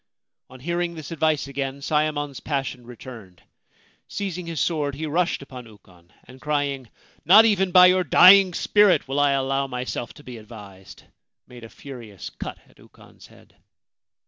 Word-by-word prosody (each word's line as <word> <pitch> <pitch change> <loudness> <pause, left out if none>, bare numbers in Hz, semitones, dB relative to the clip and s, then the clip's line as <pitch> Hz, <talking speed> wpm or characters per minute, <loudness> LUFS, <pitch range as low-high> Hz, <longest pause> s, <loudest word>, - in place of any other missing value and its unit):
On 130 - -14
hearing 170 +3 -3
this 155 -2 -9
advice 155 -3 0
again 140 0 -5
Sayemon's 150 -2 -2
passion 135 -4 -5
returned. 115 -7 -13 0.6
Seizing 180 -4 -5
his 165 -3 -5
sword, 150 -4 -1
he 155 +3 -5
rushed 165 -1 -1
upon 125 -3 -11
Ukon, 90 -5 -21
and, 130 +1 -16
crying, 140 -4 -3 0.2
' - - -32
Not 200 +8 +7
even 195 -4 +1
by 180 0 +8
your 185 0 +4
dying 185 +3 +6
spirit 205 -9 +2
will 135 +2 -2
I 145 -1 +3
allow 135 0 -1
myself 125 -2 -5
to 145 - -15
be 125 -4 -10
advised,' 105 -4 -14 0.4
made 120 -1 -14
a 115 - -10
furious 115 -9 -11
cut - - -8
at - - -26
Ukon's - - -19
head. - - -22
140 Hz, 160 wpm, -23 LUFS, 125-165 Hz, 0.6 s, by